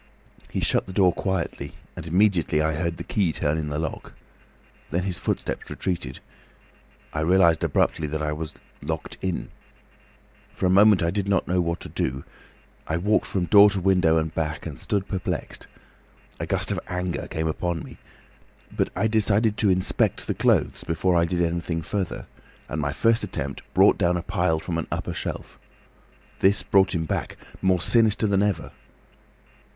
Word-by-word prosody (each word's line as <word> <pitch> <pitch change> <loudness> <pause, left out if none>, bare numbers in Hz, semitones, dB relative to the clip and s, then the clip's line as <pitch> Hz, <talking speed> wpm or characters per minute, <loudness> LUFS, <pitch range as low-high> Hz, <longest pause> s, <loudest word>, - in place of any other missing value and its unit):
"He - - -3
shut - - +1
the 95 - -7
door 95 -3 +4
quietly, 85 -7 -3 0.2
and 80 - -7
immediately 90 -3 +2
I 80 +1 +1
heard 85 +2 -2
the - - -5
key 95 -6 0
turn 80 0 -1
in 75 -1 -3
the 75 - -2
lock. 80 -1 -5 0.8
Then 85 +3 -1
his 95 -2 -2
footsteps - - -3
retreated. 90 -3 -4 0.9
I 75 - -2
realised 85 0 +4
abruptly 75 - +1
that 75 +1 -3
I 75 - -1
was 75 0 -6 0.3
locked - - -5
in. 95 -2 -3 1.0
For - - -2
a 90 - +3
minute 100 -1 +6
I 85 - +1
did 100 0 -1
not 100 - +1
know 90 0 +2
what 85 0 -2
to - - -7
do. 65 +1 -2 0.6
I 80 - 0
walked 105 +5 +1
from 95 -3 -1
door 100 +3 +8
to 100 -1 -1
window 90 -3 +3
and 80 0 -1
back, 80 -1 -3
and 75 -5 -6
stood 100 -1 -1
perplexed. 95 -3 -4 0.7
A - - -3
gust - - -1
of - - -1
anger 90 0 -3
came 80 0 -2
upon 85 +1 -2
me. - - -12 0.8
But - - +1
I 100 +4 +1
decided 110 0 +2
to 105 - +3
inspect 95 0 +1
the - - -1
clothes - - +1
before 90 +2 0
I 85 0 +4
did 85 0 0
anything 85 -1 -2
further, 100 -1 -3 0.4
and 75 - -3
my 70 -1 -1
first 115 +9 +2
attempt - - -4
brought - - +5
down 90 0 +2
a 85 - -4
pile 80 -1 0
from 85 0 -3
an 80 - -4
upper - - -3
shelf. - - -6 0.8
This 100 +1 +3
brought 95 -1 +3
him 80 -1 -1
back, - - -3 0.2
more 95 -1 +3
sinister 110 +3 +3
than 100 -2 +2
ever. 100 -5 -1
90 Hz, 175 wpm, -25 LUFS, 80-95 Hz, 1.0 s, door